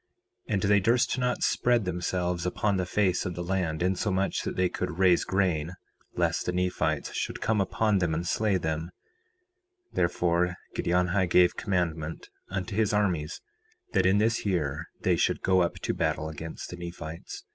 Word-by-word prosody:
4:6 -, -, -1 dB
And 95 Hz, -, +1 dB
they 100 Hz, 0 st, +5 dB
durst 120 Hz, +5 st, +2 dB
not 125 Hz, 0 st, 0 dB
spread 120 Hz, -4 st, +2 dB
themselves 90 Hz, 0 st, -1 dB
upon 100 Hz, +2 st, 0 dB
the 90 Hz, -1 st, -1 dB
face 95 Hz, -2 st, +1 dB
of 90 Hz, -, -4 dB
the 90 Hz, -, -3 dB
land 85 Hz, -3 st, -1 dB
insomuch 95 Hz, +1 st, 0 dB
that -, -, -4 dB
they 90 Hz, 0 st, +2 dB
could 90 Hz, -1 st, -4 dB
raise 90 Hz, -2 st, +4 dB
grain, 90 Hz, -4 st, 0 dB, 0.4 s
lest -, -, 0 dB
the -, -, +2 dB
Nephites 90 Hz, 0 st, -1 dB
should -, -, -3 dB
come 110 Hz, -2 st, +1 dB
upon 105 Hz, +1 st, +1 dB
them 85 Hz, -3 st, 0 dB
and 85 Hz, +2 st, -2 dB
slay 105 Hz, +2 st, +1 dB
them; 80 Hz, 0 st, -2 dB, 1.0 s
therefore 90 Hz, +1 st, +1 dB, 0.2 s
Giddianhi 90 Hz, +1 st, +1 dB
gave 90 Hz, 0 st, +5 dB
commandment 85 Hz, -6 st, -2 dB, 0.2 s
unto 95 Hz, +2 st, -3 dB
his 110 Hz, 0 st, +2 dB
armies 90 Hz, -6 st, 0 dB, 0.5 s
that 95 Hz, -2 st, +3 dB
in 95 Hz, +2 st, +4 dB
this 110 Hz, +2 st, +2 dB
year 80 Hz, -5 st, -1 dB
they -, -, +3 dB
should -, -, +1 dB
go 95 Hz, 0 st, +4 dB
up 85 Hz, -, 0 dB
to -, -, -1 dB
battle 80 Hz, -, -1 dB
against 80 Hz, +1 st, -7 dB
the 90 Hz, -, -7 dB
Nephites. 85 Hz, -2 st, -7 dB
90 Hz, 170 wpm, -28 LUFS, 85-100 Hz, 1.0 s, they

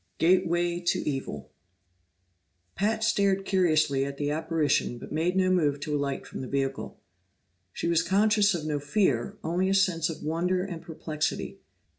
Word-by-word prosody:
8 -, -, +1 dB
Gateway 175 Hz, -1 st, +2 dB
to 175 Hz, -1 st, -1 dB
Evil 135 Hz, -, -4 dB, 1.2 s
Pat 215 Hz, +3 st, 0 dB
stared 200 Hz, -3 st, +2 dB
curiously 155 Hz, -8 st, +2 dB
at 140 Hz, 0 st, -5 dB
the 145 Hz, 0 st, -1 dB
apparition 155 Hz, -5 st, 0 dB
but -, -, -10 dB
made 165 Hz, +4 st, 0 dB
no 185 Hz, -1 st, +3 dB
move 150 Hz, -6 st, +2 dB
to 150 Hz, 0 st, -2 dB
alight 140 Hz, -1 st, -2 dB
from -, -, -7 dB
the 130 Hz, -, -5 dB
vehicle. 135 Hz, 0 st, -3 dB, 0.7 s
She -, -, -3 dB
was 170 Hz, -1 st, +3 dB
conscious 205 Hz, +2 st, +3 dB
of 155 Hz, -3 st, -4 dB
no 150 Hz, -1 st, -1 dB
fear, 140 Hz, -, 0 dB
only 180 Hz, +3 st, 0 dB
a 195 Hz, -, +2 dB
sense 175 Hz, -4 st, +2 dB
of 165 Hz, -, -7 dB
wonder 175 Hz, +4 st, 0 dB
and 175 Hz, -4 st, -6 dB
perplexity. 155 Hz, -1 st, -4 dB
165 Hz, 160 wpm, -27 LUFS, 145-185 Hz, 1.2 s, no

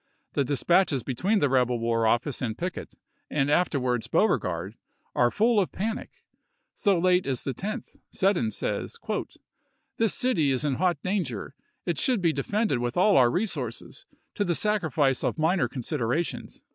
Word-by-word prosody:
The 140 Hz, -, +2 dB
dispatches 145 Hz, +1 st, +2 dB
between 180 Hz, -, 0 dB
the 145 Hz, -, +4 dB
rebel 125 Hz, -2 st, +2 dB
war 115 Hz, -1 st, +1 dB
office 120 Hz, +5 st, 0 dB
and 115 Hz, -3 st, -2 dB
Pickett, 180 Hz, +1 st, -5 dB, 0.3 s
and 145 Hz, -1 st, +1 dB
afterwards 125 Hz, -9 st, +1 dB
Beauregard, 95 Hz, -, 0 dB, 0.4 s
are 120 Hz, -1 st, +3 dB
full 220 Hz, -, +3 dB
of 190 Hz, -, 0 dB
panic. 220 Hz, +3 st, -3 dB, 0.6 s
So 200 Hz, -4 st, +2 dB
late 180 Hz, 0 st, +2 dB
as 130 Hz, -3 st, -2 dB
the 135 Hz, -, -2 dB
10th 215 Hz, -, -6 dB
Seddon 190 Hz, -, +1 dB
says: -, -, -3 dB, 0.5 s
" -, -, -48 dB
This 225 Hz, -2 st, +1 dB
city 245 Hz, -, +1 dB
is 135 Hz, +2 st, 0 dB
in 145 Hz, -, +1 dB
hot 175 Hz, +3 st, +1 dB
danger. 170 Hz, -, -2 dB, 0.3 s
It 170 Hz, -5 st, -1 dB
should 250 Hz, -4 st, +2 dB
be 170 Hz, -3 st, +2 dB
defended 175 Hz, -, 0 dB
with 120 Hz, +3 st, -2 dB
all 195 Hz, +2 st, +5 dB
our 125 Hz, -2 st, +6 dB
resources, 145 Hz, -, -2 dB, 0.3 s
to -, -, 0 dB
the 175 Hz, -3 st, 0 dB
sacrifice 160 Hz, -11 st, +1 dB
of -, -, -1 dB
minor 165 Hz, +3 st, +2 dB
considerations." 130 Hz, +3 st, -3 dB
150 Hz, 160 wpm, -26 LUFS, 125-190 Hz, 0.6 s, our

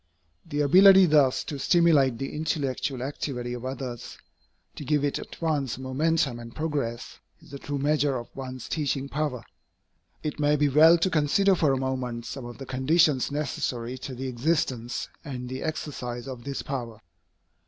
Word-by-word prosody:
The 145 Hz, 0 st, -1 dB
ability 190 Hz, +6 st, +7 dB
thus 145 Hz, -5 st, +3 dB
to 145 Hz, -, -6 dB
stimulate 150 Hz, -6 st, +4 dB
the 135 Hz, +3 st, -5 dB
intellectual 140 Hz, -4 st, -2 dB
activity 125 Hz, -3 st, -4 dB
of 120 Hz, 0 st, -6 dB
others, 130 Hz, -2 st, -6 dB, 0.6 s
to -, -, -7 dB
give 150 Hz, +1 st, +1 dB
it 145 Hz, -, -1 dB
at -, -, -10 dB
once 145 Hz, -7 st, -1 dB
momentum 135 Hz, 0 st, 0 dB
and 115 Hz, 0 st, -10 dB
progress, 145 Hz, -7 st, -3 dB, 0.2 s
is 160 Hz, -2 st, -18 dB
the 140 Hz, -, -7 dB
true 145 Hz, +1 st, -4 dB
measure 145 Hz, -1 st, +1 dB
of 120 Hz, -, -9 dB
one's 130 Hz, -2 st, -7 dB
teaching 140 Hz, -3 st, -1 dB
power. 145 Hz, -4 st, -2 dB, 0.8 s
It 150 Hz, -1 st, -4 dB
may 150 Hz, 0 st, +3 dB
be 145 Hz, 0 st, +2 dB
well 160 Hz, +5 st, +7 dB
to 170 Hz, +3 st, +1 dB
consider 165 Hz, +6 st, +3 dB
for 155 Hz, -6 st, +2 dB
a 135 Hz, -, +1 dB
moment 130 Hz, -3 st, -3 dB
some 135 Hz, -2 st, -6 dB
of 120 Hz, 0 st, -9 dB
the 135 Hz, -, -8 dB
conditions 130 Hz, +2 st, +2 dB
necessary 130 Hz, -4 st, -3 dB
to 130 Hz, 0 st, -7 dB
the 130 Hz, +2 st, -5 dB
existence 125 Hz, -2 st, -1 dB, 0.2 s
and 125 Hz, -5 st, -6 dB
the 130 Hz, +1 st, -5 dB
exercise 125 Hz, -6 st, -4 dB
of 125 Hz, -3 st, -8 dB
this 140 Hz, -1 st, -4 dB
power. 120 Hz, -5 st, -5 dB
135 Hz, 165 wpm, -26 LUFS, 125-150 Hz, 0.8 s, ability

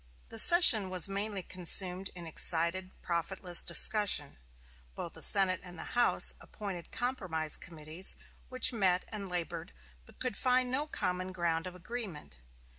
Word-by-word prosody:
The 225 Hz, -, 0 dB
session 245 Hz, -, +7 dB
was 185 Hz, 0 st, +1 dB
mainly 200 Hz, 0 st, -5 dB
consumed 185 Hz, +1 st, -1 dB
in 175 Hz, -1 st, -9 dB
excited, 170 Hz, +3 st, -2 dB
profitless 175 Hz, +1 st, +1 dB
discussion. 210 Hz, -, +3 dB, 0.6 s
Both -, -, -8 dB
the -, -, -8 dB
Senate 190 Hz, -2 st, +2 dB
and 175 Hz, -2 st, -12 dB
House 240 Hz, 0 st, +3 dB
appointed 195 Hz, -5 st, -9 dB
compromise 185 Hz, -, -2 dB
committees, 160 Hz, +1 st, -2 dB, 0.3 s
which 255 Hz, 0 st, +3 dB
met 185 Hz, -5 st, -1 dB
and 200 Hz, -3 st, -7 dB
labored, 175 Hz, -, -6 dB, 0.3 s
but -, -, -20 dB
could 255 Hz, -5 st, -3 dB
find 255 Hz, +1 st, +1 dB
no 285 Hz, +4 st, -1 dB
common 185 Hz, -8 st, -5 dB
ground 170 Hz, -2 st, -4 dB
of 180 Hz, -, -11 dB
agreement. 180 Hz, -, -9 dB
185 Hz, 135 wpm, -30 LUFS, 175-215 Hz, 0.6 s, session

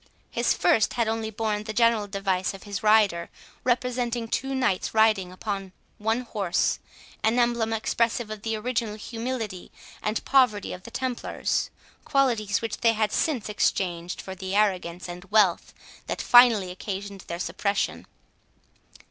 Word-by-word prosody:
His -, -, +1 dB
first 220 Hz, -, +3 dB
had 235 Hz, -2 st, 0 dB
only 220 Hz, 0 st, -1 dB
borne 215 Hz, -1 st, -2 dB
the 215 Hz, -, -4 dB
general 230 Hz, -2 st, +3 dB
device 195 Hz, -1 st, -1 dB
of 195 Hz, -, -12 dB
his 200 Hz, -1 st, -5 dB
rider, 210 Hz, -5 st, +3 dB, 0.3 s
representing 245 Hz, -1 st, 0 dB
two 270 Hz, +4 st, -2 dB
knights 235 Hz, -7 st, 0 dB
riding 215 Hz, -4 st, +3 dB
upon 195 Hz, 0 st, -5 dB, 0.3 s
one 225 Hz, +3 st, 0 dB
horse, 200 Hz, -7 st, 0 dB, 0.4 s
an 225 Hz, +2 st, +2 dB
emblem 235 Hz, -2 st, +2 dB
expressive 225 Hz, 0 st, 0 dB
of 215 Hz, -1 st, -6 dB
the 225 Hz, +1 st, -2 dB
original 230 Hz, -1 st, -2 dB
humility 225 Hz, -3 st, -5 dB, 0.3 s
and 215 Hz, +1 st, -2 dB
poverty 250 Hz, -7 st, +3 dB
of 180 Hz, -, -8 dB
the 235 Hz, -, -11 dB
Templars, 250 Hz, 0 st, -2 dB, 0.3 s
qualities 235 Hz, -7 st, +1 dB
which 225 Hz, -, -3 dB
they 230 Hz, -1 st, +3 dB
had 215 Hz, -1 st, 0 dB
since 280 Hz, -9 st, 0 dB
exchanged 180 Hz, -4 st, -1 dB
for 190 Hz, -, -7 dB
the 190 Hz, +1 st, -5 dB
arrogance 185 Hz, -4 st, 0 dB
and 175 Hz, +1 st, -8 dB
wealth 205 Hz, -5 st, +3 dB, 0.4 s
that -, -, -3 dB
finally 230 Hz, -7 st, +6 dB
occasioned 195 Hz, +1 st, -6 dB
their 170 Hz, -, -4 dB
suppression. 200 Hz, +3 st, -2 dB
215 Hz, 145 wpm, -26 LUFS, 195-235 Hz, 0.4 s, finally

